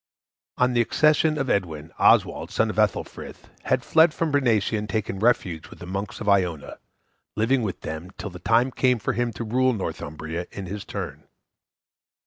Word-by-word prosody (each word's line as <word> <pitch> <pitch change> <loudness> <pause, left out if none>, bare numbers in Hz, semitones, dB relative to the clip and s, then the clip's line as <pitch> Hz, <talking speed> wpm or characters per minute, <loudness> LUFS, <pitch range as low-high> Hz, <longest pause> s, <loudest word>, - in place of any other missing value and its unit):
On 125 0 +2
the 120 - +3
accession 155 +5 +3
of 135 -2 -1
Edwin, 80 - -2
Oswald, - - +3
son - - +1
of - - -10
Ethelfrith, - - -2 0.2
had - - +1
fled 160 0 +4
from 165 -2 -1
Bernicia 115 -7 +2
and 105 -1 -3
taken 100 -1 -2
refuge 95 -8 +1
with - - -12
the - - -9
monks 100 +3 -5
of 105 - -6
Iona, 90 -6 +1 0.6
living 125 +5 +2
with 105 -5 -4
them 80 +3 -6
till 105 - -6
the 90 - -10
time 120 +6 +2
came 125 0 +2
for 105 - -2
him 120 0 -1
to 115 - -5
rule 130 +3 +2
Northumbria 80 -4 -5
in 100 - -7
his 100 +2 -6
turn. - - -6
110 Hz, 175 wpm, -24 LUFS, 90-125 Hz, 0.6 s, fled